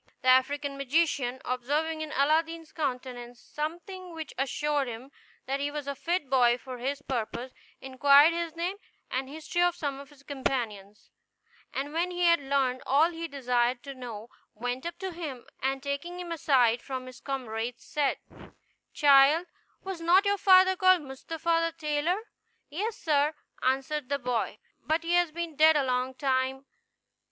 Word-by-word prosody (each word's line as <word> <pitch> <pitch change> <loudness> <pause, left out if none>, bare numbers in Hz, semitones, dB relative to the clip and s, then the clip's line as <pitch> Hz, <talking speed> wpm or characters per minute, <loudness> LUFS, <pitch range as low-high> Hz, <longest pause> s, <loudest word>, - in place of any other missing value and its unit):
The 255 - +3
African 275 +2 +2
magician, 275 -3 +1
observing 295 +6 -1
in 310 -1 -5
Aladdin's 320 +3 +1
countenance 250 -4 -4
something 345 +3 -6
which 320 -2 -7
assured 285 +1 0
him 240 +3 -8 0.3
that 270 +1 -2
he 285 +1 -1
was 295 -1 -5
a 280 - -2
fit 335 +1 -2
boy 245 -2 +4
for 255 0 -9
his 280 +3 -3
purpose, 245 0 -3 0.3
inquired 280 +4 +6
his 335 -1 -3
name 355 +4 -2 0.3
and 260 +1 -2
history 315 +4 -3
of 350 0 +3
some 285 -5 -3
of 280 -1 -11
his 285 -2 -19
companions; 230 -8 -4 0.6
and 285 +2 -4
when 340 +2 0
he 355 0 -4
had 340 -1 +5
learned 270 -2 0
all 305 +5 +4
he 335 0 -5
desired 245 -3 0
to 275 - -7
know, 235 -4 -8 0.3
went 245 +6 -3
up 340 0 -6
to 380 +1 -4
him, 305 -8 -6 0.2
and 270 +1 -1
taking 285 +6 -4
him 350 -1 -6
aside 250 -7 +3
from 260 -2 -5
his 255 -1 -11
comrades, 245 -3 -4
said, 290 -3 0 0.8
"Child, 290 +3 +6 0.4
was 380 -3 -5
not 360 +4 +5
your 405 0 +1
father 375 0 +6
called 370 -3 +4
Mustapha 330 +4 -1
the - - -32
tailor?" 310 +7 0 0.5
"Yes, 415 +9 -3
sir," 300 -1 +1 0.3
answered 270 +2 0
the 280 - +1
boy; 245 -3 -2 0.2
"but 315 +1 0
he 335 +1 -1
has 350 -2 +3
been 335 -1 -5
dead 315 +2 +6
a 290 - +3
long 255 0 -1
time." 265 0 0
285 Hz, 165 wpm, -28 LUFS, 260-330 Hz, 0.8 s, inquired